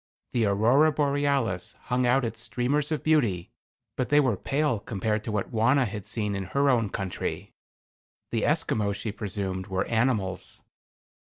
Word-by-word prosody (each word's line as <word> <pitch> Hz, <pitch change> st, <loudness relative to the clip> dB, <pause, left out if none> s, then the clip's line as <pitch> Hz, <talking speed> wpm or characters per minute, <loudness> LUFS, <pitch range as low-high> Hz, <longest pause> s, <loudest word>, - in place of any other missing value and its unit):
The 115 Hz, -3 st, +2 dB
Aurora 120 Hz, +10 st, +4 dB
Borealis 140 Hz, -10 st, 0 dB
hung 125 Hz, 0 st, -1 dB
out 125 Hz, +1 st, +3 dB
its 115 Hz, 0 st, -4 dB
streamers 140 Hz, +6 st, -1 dB
of 155 Hz, -, -1 dB
beauty, 115 Hz, -, +1 dB, 0.4 s
but 130 Hz, -, -2 dB
they 145 Hz, -, +5 dB
were 130 Hz, -7 st, +2 dB
pale 140 Hz, +1 st, 0 dB
compared 105 Hz, +1 st, -2 dB
to 110 Hz, -, -3 dB
what 105 Hz, -2 st, -2 dB
Wauna 125 Hz, +4 st, +3 dB
had 105 Hz, -2 st, -6 dB
seen 105 Hz, -3 st, -1 dB
in 95 Hz, -1 st, -3 dB
her 140 Hz, +6 st, +2 dB
own 115 Hz, -4 st, +1 dB
country. 95 Hz, -1 st, -4 dB, 0.8 s
The -, -, 0 dB
Esquimaux 100 Hz, -2 st, +1 dB
she 105 Hz, +2 st, -4 dB
presumed 95 Hz, -3 st, -4 dB
were 95 Hz, -1 st, -1 dB
animals. 110 Hz, -5 st, -1 dB
115 Hz, 155 wpm, -27 LUFS, 100-135 Hz, 0.8 s, they